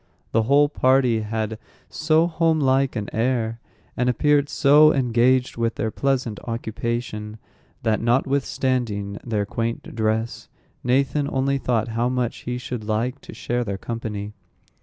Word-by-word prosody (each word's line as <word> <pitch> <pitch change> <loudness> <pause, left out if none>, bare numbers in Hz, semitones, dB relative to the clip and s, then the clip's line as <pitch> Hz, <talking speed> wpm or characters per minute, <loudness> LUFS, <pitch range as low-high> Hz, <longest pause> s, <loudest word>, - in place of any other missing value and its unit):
The 115 - +3
whole 140 +6 +4
party 130 -4 +3
had 110 0 -3 0.3
so 155 +1 +2
home 165 -1 +1
like 135 -1 +2
an 105 -3 -3
air, 115 -1 0 0.4
and 125 +1 +1
appeared 145 +3 +2
so 150 +1 +6
engaged 125 -1 +2
with 115 0 0
their 110 - -2
pleasant 130 -5 -1
occupation, 115 -1 -4 0.5
that, 110 -1 +1
notwithstanding 120 -4 0
their 105 -4 -1
quaint 115 +3 -4
dress, 110 +1 -2 0.3
Nathan 140 +3 +1
only 135 +1 0
thought 120 -3 0
how 115 +2 0
much 125 -2 -1
he 125 - -2
should 125 -2 -5
like 115 +5 -2
to - - -11
share 120 0 -2
their 100 -4 -4
company. 105 -2 -5
120 Hz, 140 wpm, -23 LUFS, 110-135 Hz, 0.5 s, so